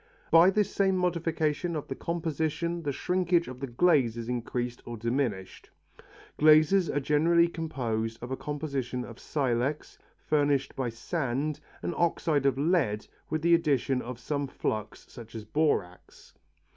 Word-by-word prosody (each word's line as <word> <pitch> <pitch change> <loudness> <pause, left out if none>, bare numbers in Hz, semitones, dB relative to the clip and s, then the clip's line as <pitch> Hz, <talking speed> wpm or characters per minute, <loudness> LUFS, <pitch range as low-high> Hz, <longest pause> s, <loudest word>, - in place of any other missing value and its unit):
By 165 +3 +8
this 205 0 +1
same 190 -1 +2
modification 165 -2 0
of 150 - -4
the - - -3
composition 170 +2 -2
the 145 -3 -2
shrinkage 180 +3 +1
of 125 0 -8
the 135 - -4
glaze 125 -3 +3
is 115 -1 -5
increased 120 0 -3
or 120 -1 -7
diminished. 115 -5 -2 0.7
Glazes 155 +4 +5
are 145 - 0
generally 165 +4 +3
composed 120 -10 -3
of 125 - -6
a - - 0
combination 140 -4 -3
of 115 - -11
silex, 135 0 -2 0.2
furnished 145 -2 0
by 130 -3 -1
sand, 140 +3 -2 0.2
and 175 - -2
oxide 160 -4 +1
of 135 - +1
lead 140 - +1 0.2
with 155 0 -2
the 170 0 +4
addition 140 -5 +2
of 125 0 -6
some 140 +3 -2
flux 110 -5 -4
such 115 -1 -12
as 110 -1 -6
borax. 105 - -2
145 Hz, 145 wpm, -28 LUFS, 120-165 Hz, 0.7 s, By